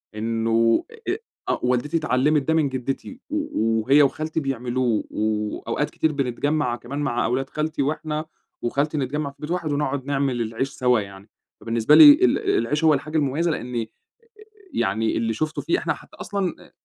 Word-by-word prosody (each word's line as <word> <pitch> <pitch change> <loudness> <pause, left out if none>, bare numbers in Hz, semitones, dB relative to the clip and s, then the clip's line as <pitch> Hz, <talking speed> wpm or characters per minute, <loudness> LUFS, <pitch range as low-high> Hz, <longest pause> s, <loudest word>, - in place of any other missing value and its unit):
إنّه 115 +1 +1
أ 455 -4 -5
أ 430 - -4 0.3
آه - - +1
والدتي 125 +6 +1
اتعلّمت 150 0 +2
ده 160 +4 0
من 155 -3 +2
جدتي 135 - -5
و 205 - 0
وهي 140 +6 +5
وخالتي 155 +3 -1
بيعملوه، 125 -4 -1
وأوقات 105 0 -2
كتير 160 - 0
بنتجمّع 140 0 -1
كمان 130 +4 -6
مع 130 -4 0
أولاد 130 +3 -1
خالتي، 155 -1 -2
وإحنا 155 +2 -2 0.4
وخالتي 145 +6 -1
نتجمع 140 +2 -2
في - - -27
بيت 150 +2 -6
واحد 175 -4 -1
ونقعد 140 -2 -1
نعمل 135 -4 0
العيش 115 +4 -2
سوا 125 -3 +2
يعني، 100 0 -9 0.3
فبالنسبة 115 +5 +3
لي 295 -2 +11
ال 370 +7 +3 0.2
العيش 150 - -1
هو 155 -1 +6
الحاجة 155 +3 -2
المميّزة 150 +4 +1
لأني 120 -5 -3 0.8
يعني 110 +3 0
اللي 115 0 0
شُفته 155 +7 -2
فيه 355 - +1
إحنا - - -1
حتّى - - -15
أصلًا 195 -4 -2
أ - - -27
135 Hz, 165 wpm, -23 LUFS, 120-155 Hz, 0.8 s, لي